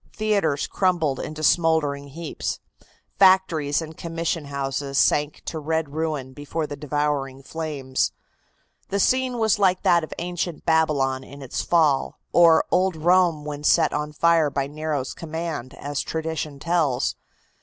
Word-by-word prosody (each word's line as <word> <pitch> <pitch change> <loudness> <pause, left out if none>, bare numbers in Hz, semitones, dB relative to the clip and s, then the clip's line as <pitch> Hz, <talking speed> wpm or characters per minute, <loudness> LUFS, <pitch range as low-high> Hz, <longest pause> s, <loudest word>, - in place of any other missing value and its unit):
Theatres 200 -10 0
crumbled 170 -8 0
into 155 0 -6
smouldering 155 -4 +2
heaps. 155 +3 -5 0.6
Factories 170 -6 +4
and 160 0 -9
commission 165 -1 -3
houses 140 0 -3
sank 145 +1 +2
to 160 - -4
red 160 0 -1
ruin 150 -5 -3
before 145 +3 -4
the 145 - -6
devouring 145 -2 -2
flames. 140 -4 -2 0.8
The 200 - -1
scene 255 +3 +2
was 220 -2 +2
like 185 -2 +2
that 170 -1 +4
of 155 - -7
ancient 175 -1 -4
Babylon 145 -5 +2
in 140 +1 -11
its 130 - -3
fall, 155 -5 +2 0.2
or 165 -2 +6
old 185 -1 +2
Rome 170 -1 +3
when 150 -1 -6
set 160 +1 +4
on 150 0 -2
fire 165 0 +3
by 140 -1 -1
Nero's 150 -2 -3
command, 160 -5 -5
as 145 0 -3
tradition 160 -2 -4
tells. 155 -4 0
155 Hz, 140 wpm, -24 LUFS, 145-170 Hz, 0.8 s, or